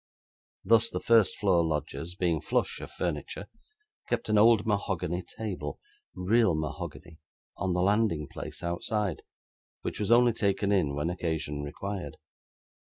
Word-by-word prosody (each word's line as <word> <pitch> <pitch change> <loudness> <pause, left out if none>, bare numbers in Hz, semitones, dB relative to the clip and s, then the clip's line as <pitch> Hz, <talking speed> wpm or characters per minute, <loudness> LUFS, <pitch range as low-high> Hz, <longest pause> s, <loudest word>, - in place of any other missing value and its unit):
Thus, 115 +3 +5
the - - -3
first 115 -3 +4
floor 95 -5 +3
lodgers, 80 +2 -3
being 85 -4 +1
flush - - -1
of - - -7
furniture, 100 - -3 0.6
kept - - -1
an 110 - +4
old 110 0 +6
mahogany 95 -4 -1
table 105 -1 -5 0.4
real 105 -1 +3
mahogany 80 +1 -5 0.4
on 95 -1 0
the 90 - +2
landing 100 -7 +2
place - - -8
outside, 90 +2 -1 0.6
which - - -4
was 105 - -1
only 120 0 +6
taken 100 -1 +1
in, 80 -8 +2
when 75 +4 -1
occasion 80 -4 -2
required. 95 +7 -5
95 Hz, 135 wpm, -29 LUFS, 80-105 Hz, 0.6 s, old